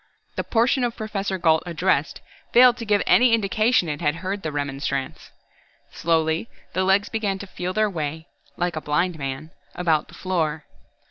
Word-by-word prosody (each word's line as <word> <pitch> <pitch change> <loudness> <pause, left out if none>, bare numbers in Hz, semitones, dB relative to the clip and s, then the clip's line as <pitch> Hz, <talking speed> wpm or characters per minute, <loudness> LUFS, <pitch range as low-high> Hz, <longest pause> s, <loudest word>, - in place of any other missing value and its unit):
The - - -2
portion 245 +3 +2
of 240 -1 -1
Professor 205 -3 -3
Gault 160 -2 +3
addressed 170 -3 0 0.3
failed 245 0 +7
to 230 - -6
give 205 -1 +2
any 245 -2 +5
indication 215 -1 +2
it 150 0 -4
had 150 -1 +1
heard 195 +2 -2
the 155 - -3
remonstrance. 140 -1 -3 0.6
Slowly, 160 +4 0 0.2
the 185 - +1
legs 195 +2 +3
began 205 -3 -1
to 200 - -8
feel 180 -1 -4
their 215 +1 +2
way, 160 -4 -4 0.3
like 175 -1 -1
a 155 - -3
blind 170 +3 0
man, 135 +3 -5 0.2
about 165 -4 +1
the - - -15
floor. 160 -5 -2
180 Hz, 165 wpm, -23 LUFS, 155-205 Hz, 0.6 s, failed